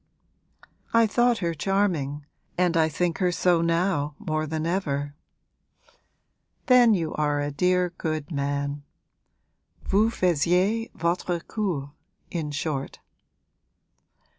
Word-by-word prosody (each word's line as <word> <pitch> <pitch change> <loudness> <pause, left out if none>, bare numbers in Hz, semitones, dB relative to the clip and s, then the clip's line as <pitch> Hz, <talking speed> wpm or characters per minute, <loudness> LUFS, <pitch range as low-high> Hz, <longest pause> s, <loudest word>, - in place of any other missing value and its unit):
'I 230 0 +6
thought 240 +2 +2
her 170 - 0
charming, 160 -6 -1 0.3
and 180 -1 +2
I 160 -1 +3
think 170 +2 -1
her 180 -2 +2
so 175 -1 +2
now 165 -3 0
more 155 -6 -2
than 160 +1 -3
ever.' 145 -6 -1 1.5
'Then 245 -4 +6
you 165 -4 -2
are 150 -1 0
a 145 0 -2
dear 180 +3 +1
good 155 -1 -3
man. 140 0 -2 1.0
Vous 215 +3 +3
faisiez 185 +4 +1
votre 170 +1 -1
cour, 165 -10 -3 0.4
in 160 -4 -3
short.' 145 -2 -3
170 Hz, 110 wpm, -25 LUFS, 145-185 Hz, 1.5 s, I